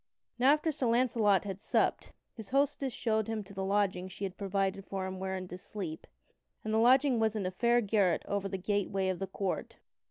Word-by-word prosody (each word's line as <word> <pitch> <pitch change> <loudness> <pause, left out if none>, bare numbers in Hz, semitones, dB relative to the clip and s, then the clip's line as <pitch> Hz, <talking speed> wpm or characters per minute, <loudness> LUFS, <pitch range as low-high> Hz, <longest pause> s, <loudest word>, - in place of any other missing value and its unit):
Now 265 +3 +6
after 305 +1 0
Sir 275 -4 -1
Launcelot 230 -4 +3
had 195 -1 -6
supped, - - 0 0.2
his 220 -3 -10
hostess 275 0 +1
showed 220 -2 0
him 220 -2 -3
to 200 - -14
the 190 0 -3
lodging 195 -2 0
she 190 +2 -9
had 190 -1 -3
provided 195 -1 -1
for 190 0 -4
him 190 0 -5
wherein 190 -1 -3
to 180 - -7
sleep, 180 -5 -7 0.6
and 215 - -2
the 220 - +3
lodging 255 +1 +5
was 220 -1 +1
in 205 -3 -2
a 185 - -1
fair 235 +5 +3
garret 200 -5 +1
over 200 -1 -1
the 190 - -3
gateway 195 0 0
of 185 - -2
the 195 - -3
court. 190 0 -3
200 Hz, 210 wpm, -31 LUFS, 190-230 Hz, 0.6 s, Now